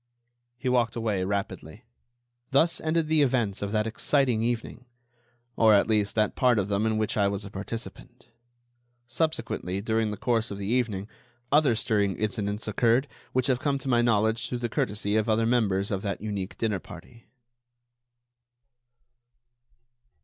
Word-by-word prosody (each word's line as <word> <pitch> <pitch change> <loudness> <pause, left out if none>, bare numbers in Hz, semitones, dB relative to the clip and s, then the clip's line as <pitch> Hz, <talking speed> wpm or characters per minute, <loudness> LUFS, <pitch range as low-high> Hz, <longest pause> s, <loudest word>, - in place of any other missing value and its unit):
He 130 +2 -5
walked 120 -3 +2
away 110 -5 -1
rapidly. 100 0 -4 0.7
Thus 160 +5 +3
ended 160 0 0
the 155 -1 +3
events 120 -8 +1
of 100 0 -3
that 105 0 +1
exciting 125 +1 +1
evening, 120 +1 -3 0.7
or, 110 -2 +5
at 100 - +3
least, 105 -2 +1
that 110 -2 +1
part 125 -3 +3
of 100 -1 0
them 100 +2 +1
in 110 -1 0
which 110 0 -1
I 100 -1 +3
was 100 0 -3
a 100 - -9
participant. 115 +4 -8 0.8
Subsequently, 120 - -2
during 110 +1 0
the 105 - -4
course 115 0 0
of 100 - -6
the 100 - -5
evening, 110 -3 -1 0.4
other 145 -5 +4
stirring 105 -4 0
incidents 105 0 -2
occurred 115 +5 +2 0.2
which 130 -1 +1
have 130 -2 +1
come 140 0 0
to 135 - -8
my 120 -2 +4
knowledge 110 -1 +1
through 125 - -2
the - - -1
courtesy 105 0 -1
of 110 +1 0
other 110 +1 +2
members 105 -5 +1
of 95 -2 -1
that 100 -2 -3
unique 100 -2 -4
dinner 105 -4 -1
party. 115 +7 -13
110 Hz, 155 wpm, -27 LUFS, 100-120 Hz, 0.8 s, or